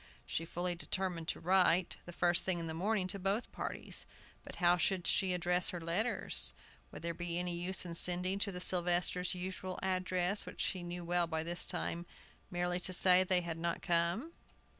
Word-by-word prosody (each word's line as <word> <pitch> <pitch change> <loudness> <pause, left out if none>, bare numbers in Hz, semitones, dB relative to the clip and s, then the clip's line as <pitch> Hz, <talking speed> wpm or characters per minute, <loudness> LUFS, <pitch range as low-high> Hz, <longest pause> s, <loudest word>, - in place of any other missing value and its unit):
She 165 - -2
fully 175 +1 -2
determined 175 -1 -3
to - - -2
write, 180 0 +3
the - - -6
first 175 0 +3
thing 185 -2 +1
in 165 - -4
the 160 - -4
morning, 195 +4 0
to 200 +1 -1
both 195 +5 -1
parties. - - -6 0.4
But - - -10
how 175 -1 +4
should 180 +1 0
she 190 -2 +3
address 180 0 +1
her 175 - -4
letters? 175 +9 +1 0.4
Would - - -10
there 170 0 -2
be 175 0 -3
any 180 -1 -2
use 180 +2 +2
in 170 - -6
sending 180 +3 +3
to 200 0 -1
the 180 - -6
Sylvesters' 180 0 +1
usual 185 0 -5
address, 185 +1 0
which - - -10
she 185 - 0
knew 175 0 -6
well 175 0 +1
by 160 -1 -2
this 175 +1 +1
time, 170 +1 -3 0.4
merely 175 0 -1
to 185 +1 -2
say 185 0 +6
they 185 -1 +2
had 165 -1 -5
not 170 0 -2
come? 175 - 0
180 Hz, 190 wpm, -34 LUFS, 170-185 Hz, 0.4 s, say